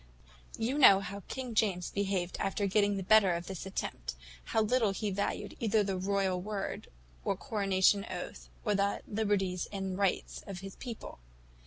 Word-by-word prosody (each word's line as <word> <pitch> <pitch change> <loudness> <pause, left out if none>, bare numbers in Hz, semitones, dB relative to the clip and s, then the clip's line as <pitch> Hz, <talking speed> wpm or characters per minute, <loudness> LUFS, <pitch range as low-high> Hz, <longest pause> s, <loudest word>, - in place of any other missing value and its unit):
You 255 +6 0
know 195 -8 +8
how 200 +1 -5
King 255 -3 -5
James 195 -5 +1
behaved 195 -3 -1
after 195 +1 0
getting 205 0 +2
the 190 - -3
better 195 -2 +5
of 170 +1 -4
this 190 0 -6
attempt; 65 - -4 0.3
how 220 - +2
little 225 0 +3
he 210 +1 -2
valued 200 +1 -2
either 220 -2 +3
his 190 -2 -2
royal 195 -2 +1
word, 200 0 -4 0.4
or 195 - 0
coronation 200 -3 +2
oath, - - -6 0.2
or 210 - +2
the 200 0 0
liberties 200 -4 0
and 190 -1 -3
rights 195 -2 0
of 195 -2 -6
his 195 0 -8
people. 235 - -7
200 Hz, 165 wpm, -32 LUFS, 190-210 Hz, 0.4 s, know